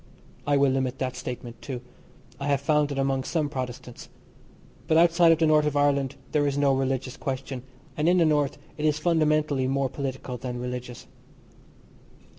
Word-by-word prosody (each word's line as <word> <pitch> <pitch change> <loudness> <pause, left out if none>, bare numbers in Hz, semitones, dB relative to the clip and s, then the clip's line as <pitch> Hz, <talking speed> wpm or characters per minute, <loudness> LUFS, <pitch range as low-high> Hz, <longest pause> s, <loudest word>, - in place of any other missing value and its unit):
I 145 -1 +3
will 140 -1 +4
limit 130 -1 -1
that 130 -1 -3
statement, 125 -2 -7
too. 130 -3 -5 0.6
I 140 - -3
have 140 -1 +1
found 150 0 +2
it 140 - -3
among 135 -1 0
some 155 -1 -1
Protestants. 125 -3 -6 0.8
But 160 - +3
outside 170 0 +5
of 165 - +4
the 165 - +2
North 155 -1 +4
of 145 -1 -1
Ireland 140 -2 +2 0.2
there 145 -1 +2
is 140 0 -1
no 140 -1 +3
religious 130 -1 -1
question, 135 -2 -4 0.3
and 155 +3 +2
in 180 - +4
the 170 - +4
North 150 -3 +1 0.2
it 150 - -1
is 150 -1 +2
fundamentally 155 -4 +1
more 135 0 0
political 130 -2 -5
than 125 0 -5
religious. 125 -1 -6
140 Hz, 175 wpm, -26 LUFS, 130-150 Hz, 0.8 s, outside